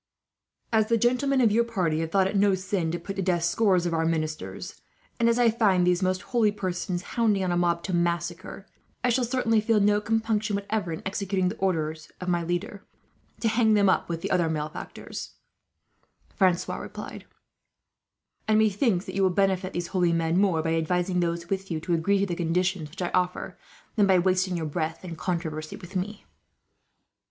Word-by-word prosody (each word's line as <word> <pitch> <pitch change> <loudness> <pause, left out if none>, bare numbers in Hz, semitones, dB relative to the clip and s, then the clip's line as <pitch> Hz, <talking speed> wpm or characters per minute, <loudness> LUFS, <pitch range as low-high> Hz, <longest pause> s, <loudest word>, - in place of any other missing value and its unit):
"As 220 -1 +3
the 230 - +3
gentlemen 255 +4 +2
of 225 -4 +4
your 230 +3 +4
party 185 -9 -1
have 165 0 -2
thought 190 +2 +3
it 195 - -2
no 200 -1 +4
sin 190 -3 -2
to 170 - -2
put 195 +3 -7
to - - 0
death 175 -2 +1
scores 185 0 +2
of 170 - -1
our 165 0 +1
ministers, 155 -1 -3 0.4
and 235 0 +4
as 235 - +2
I 240 -2 +4
found 200 -6 +3
these 180 +1 +2
most 185 0 0
holy 225 -3 +4
persons 185 -2 -3
hounding 215 -5 +2
on 180 - 0
a - - +1
mob 170 -1 +1
to 190 - -3
massacre, 175 +3 -2 0.4
I 250 - +3
shall 245 +1 +2
certainly 230 -3 +1
feel 220 0 +2
no 205 +1 +3
compunction, 220 -1 0
whatever, 200 -2 -2
in 160 - -5
executing 190 -1 0
the 215 - -6
orders 160 -4 -2
of 180 - -4
my 175 -1 +1
leader, 175 +4 -3 0.6
to 230 - +2
hang 220 -1 +3
them 200 -2 +5 0.2
with 165 -1 -4
the - - -3
other 170 -3 +2
malefactors," 155 -1 -6 1.0
Francois 185 -3 +1
replied; - - -8 1.2
"and 215 0 +4
methinks 215 -2 +2
that - - -7
you 195 - 0
will 190 - +4
benefit 190 0 +1
these 175 0 -3
holy 180 -3 +2
men 165 0 +1
more, 180 -6 +2
by 165 0 0
advising 180 +3 0
those 170 0 -1
with 195 0 -3
you 165 -3 -2
to 170 +2 -2
agree 170 +5 +2
to 200 - +1
the 180 - -3
conditions 175 -1 -1
which 185 +4 -6
I 175 - -1
offer, 180 0 -1 0.4
than 205 -3 +4
by 190 -1 +5
wasting 185 0 +1
your 160 - -3
breath 160 +3 -3
in 170 -2 -6
controversy 160 -2 -3
with 190 -1 -12
me." 200 +3 -4
185 Hz, 195 wpm, -26 LUFS, 170-205 Hz, 1.2 s, them